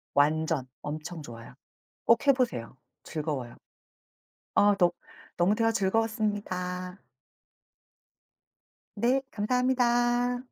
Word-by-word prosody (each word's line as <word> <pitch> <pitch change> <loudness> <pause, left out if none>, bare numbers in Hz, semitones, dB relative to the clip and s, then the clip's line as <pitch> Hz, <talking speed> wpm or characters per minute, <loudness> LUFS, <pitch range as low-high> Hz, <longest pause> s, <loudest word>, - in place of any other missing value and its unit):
완전 155 -1 +2
엄청 155 +2 -6
좋아요. 115 -2 -10 0.5
꼭 230 +3 +4
해 275 - +8
보세요. 135 - -2 0.3
즐거워요. 145 -6 -4 1.0
어 205 0 +5
너 175 -2 +3 0.4
너무 180 +4 +3
대화 225 0 +2
즐거웠습니다. 195 -4 -1 2.0
네. 250 +5 +2
감사합니다. 245 +1 +1
200 Hz, 195 characters per minute, -28 LUFS, 155-235 Hz, 2.0 s, 해